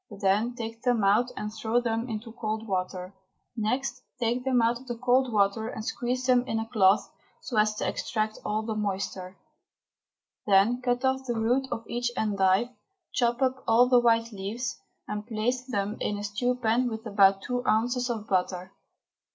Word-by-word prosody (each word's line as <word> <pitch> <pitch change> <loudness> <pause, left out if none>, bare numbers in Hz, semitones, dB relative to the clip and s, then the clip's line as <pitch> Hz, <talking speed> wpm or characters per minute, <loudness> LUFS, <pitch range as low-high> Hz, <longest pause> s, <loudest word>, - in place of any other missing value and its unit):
Then 210 +5 +2
take 230 -1 -6
them 240 -4 +1
out 210 +5 +3
and 210 0 -4
throw 220 +2 0
them 230 0 -2
into 225 +1 -5
cold 220 0 -4
water. 185 -1 -3 0.4
Next 250 +3 -1 0.2
take 240 +1 0
them 260 -2 +2
out 235 +1 +2
of 260 - -16
the 240 -1 -4
cold 255 +1 +2
water 210 +1 +2
and 220 -2 -6
squeeze 255 0 -2
them 250 -1 +4
in 225 - -1
a 225 - -2
cloth 200 -3 +3 0.3
so 245 - -5
as 215 0 +3
to - - -2
extract 215 -2 -2
all 215 +1 -1
the 220 0 -3
moisture. 195 -3 -3 1.1
Then 205 +5 +4
cut 245 +1 0
off 265 0 +1
the 240 - -1
root 245 +4 +1
of 225 - -4
each 240 0 -1
endive, 200 +1 +2 0.4
chop 240 +1 +1
up 260 0 0
all 240 +2 +5
the 250 -1 +6
white 230 -1 +2
leaves, 215 +5 -4 0.3
and 210 +1 -5
place 245 +3 -1
them 205 -3 -2
in 205 - -1
a 205 - -5
stew 225 +5 0
pan 245 +1 +1
with 220 0 -6
about 195 -2 +4
two 245 0 -2
ounces 245 +3 +1
of 220 -3 -3
butter. 185 0 -1
225 Hz, 180 wpm, -27 LUFS, 210-245 Hz, 1.1 s, the